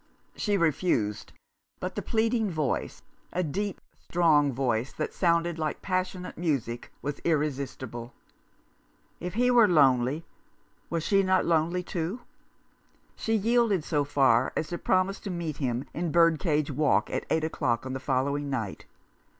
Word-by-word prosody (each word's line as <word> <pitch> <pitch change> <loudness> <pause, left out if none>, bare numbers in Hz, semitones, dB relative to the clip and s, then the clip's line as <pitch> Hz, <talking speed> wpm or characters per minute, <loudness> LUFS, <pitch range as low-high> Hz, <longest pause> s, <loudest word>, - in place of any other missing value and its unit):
She 205 -2 0
refused, 150 - 0 0.5
but - - -4
the - - -3
pleading 225 -1 +1
voice 155 -6 -2
— - - -37
a 180 - 0
deep, 195 +6 -3 0.2
strong 155 -5 +3
voice 125 -1 -1
that 155 - -3
sounded 170 -1 +1
like 155 -1 -3
passionate 185 -2 -3
music 135 -8 -2
— - - -39
was 145 +1 -3
irresistible. 135 -6 -2 1.1
If 180 +2 -5
he 250 +2 +3
were 235 -3 +6
lonely, 140 -2 +3 0.6
was 165 -2 -1
she 195 +2 +3
not 185 -1 +2
lonely 170 +2 +1
too? 180 +7 -3 0.9
She 225 - -1
yielded 220 -4 +2
so 150 -2 0
far 135 -4 +3
as 155 - -2
to 175 - -4
promise 185 +1 +1
to - - -7
meet 170 -5 -3
him 125 -2 -2
in 170 0 -2
Birdcage 160 -3 +3
Walk 135 -8 +2
at - - -3
eight 160 - +1
o'clock 120 -6 -1
on 130 - -4
the 130 - -3
following 140 +2 -1
night. 115 -8 -4
160 Hz, 150 wpm, -28 LUFS, 135-185 Hz, 1.1 s, were